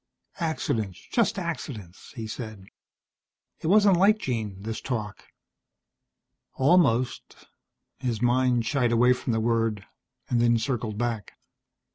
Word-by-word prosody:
"Accidents, 110 - -2
just 230 -4 +2
accidents," 135 - -6
he 115 - -5
said. 110 -3 -7 0.9
It - - -4
wasn't 200 0 +5
like 205 +4 +5
Jean, 110 - -3
this 110 0 -4
talk. 110 -6 -4 1.3
Almost 130 -5 +2 0.5
His 120 -4 -2
mind 125 -1 +2
shied 125 -1 +1
away 120 +2 +5
from 125 - -3
the 110 - +1
word, 115 -3 0 0.4
and 120 -1 +3
circled 110 -2 -2
back. 115 -4 -3
120 Hz, 110 wpm, -26 LUFS, 110-135 Hz, 1.3 s, wasn't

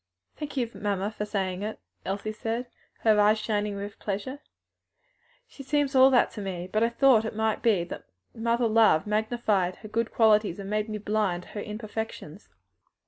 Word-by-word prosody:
"Thank 295 -2 -7
you, 245 -2 +1
mamma, 200 0 -2
for 210 -1 -4
saying 190 -3 -2
it," 215 +1 -4 0.3
Elsie 200 +3 -3
said, 225 +3 -3 0.4
her 215 -2 +4
eyes 210 +1 +5
shining 210 -1 -1
with 200 +1 -7
pleasure. 210 +8 -4 1.1
"She - - -12
seems 290 0 0
all 260 0 +7
that 255 -3 +3
to 210 - -7
me; 180 -2 -4
but 215 - +2
I 230 - +3
thought 235 -2 +4
it 220 - -4
might 220 0 0
be 215 -7 +3
that 170 - -8 0.3
mother 235 +1 +1
love 220 -8 +4
magnified 210 -4 0
her - - -11
good 225 +2 -1
qualities 215 -5 +3
and 200 0 -6
made 215 +1 -1
me 215 - -3
blind 205 -4 -1
to - - -16
her 205 - -5
imperfections." 215 -5 -6
215 Hz, 180 wpm, -27 LUFS, 200-230 Hz, 1.1 s, all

